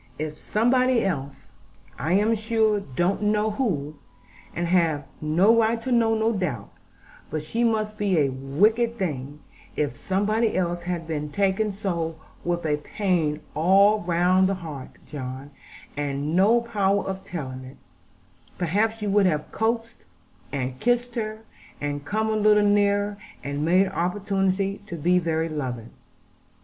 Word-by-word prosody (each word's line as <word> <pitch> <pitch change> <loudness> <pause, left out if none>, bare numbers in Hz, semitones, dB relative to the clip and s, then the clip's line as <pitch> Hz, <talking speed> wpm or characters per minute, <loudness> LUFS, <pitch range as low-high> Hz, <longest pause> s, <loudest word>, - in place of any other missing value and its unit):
If 155 0 -4
somebody 245 +6 +2
else 140 -7 -3 0.5
I 155 +7 0
am 210 +4 +3
sure 220 -1 +1
I - - -9
don't 180 +7 +1
know 210 +1 +1
who, 155 - -2 0.6
and 175 - -1
have 165 -5 +1
no 175 +9 +4
right 230 0 +2
to 260 - -3
know, 230 -2 +3
no 220 +1 +2
doubt, 150 - -3 0.6
but 155 0 -3
she 230 +10 -1
must 215 -2 0
be 200 -4 +1
a 145 -3 +3
wicked 210 - +1
thing 145 - -4 0.3
if 145 -2 -1
somebody 215 +4 0
else 175 -1 -1
had 175 -1 -3
been 150 -2 -4
taken 200 +3 +1
so 170 -5 -3 0.3
with 175 -1 -1
a 150 -1 +1
pain 160 -2 -1
all 195 +6 +5
round 180 +1 +3
the 195 - 0
heart, 155 -7 -7 0.2
John, 135 0 -7 0.4
and 145 +2 -2
no 215 +6 +5
power 200 -4 0
of 190 0 -4
telling 130 -9 -6
it, 130 +1 -12 0.8
perhaps 210 +6 0
you 205 - 0
would 200 -1 +4
have 155 -3 -1
coaxed, 230 +1 -1 0.5
and 130 -2 -3
kissed 245 +1 +1
her, 215 -2 -4 0.4
and 145 0 -3
come 220 +4 0
a - - +1
little 210 -1 +4
nearer, 205 0 +2 0.3
and 140 +1 -3
made 185 +4 +4
opportunity 195 +1 -1
to 175 - -5
be 175 +3 +2
very 165 -1 0
loving.' 130 -7 -4
185 Hz, 150 wpm, -25 LUFS, 155-215 Hz, 0.8 s, all